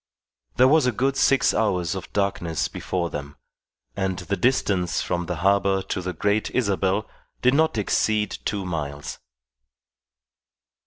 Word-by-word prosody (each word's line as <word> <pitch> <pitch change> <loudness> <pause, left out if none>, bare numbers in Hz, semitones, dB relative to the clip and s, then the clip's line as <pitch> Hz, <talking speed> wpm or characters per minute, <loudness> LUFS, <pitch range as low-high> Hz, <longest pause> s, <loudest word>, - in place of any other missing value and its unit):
There 130 - +6
was 150 -1 +4
a - - +3
good 135 +2 0
six 135 -1 +3
hours 90 -7 0
of - - -7
darkness 95 -5 -1
before 85 -2 -3
them, 70 0 -6 0.6
and 95 -1 -1
the 95 +3 -2
distance 100 -8 +1
from 90 -1 -2
the 90 - -2
harbour 100 -1 +3
to 95 -1 -3
the 90 0 -3
Great 105 +5 0
Isabel 100 -3 +1 0.4
did 125 +1 +5
not 160 -3 +2
exceed 105 0 0
two 100 -2 -2
miles. 75 -5 -5
100 Hz, 140 wpm, -24 LUFS, 90-110 Hz, 0.6 s, There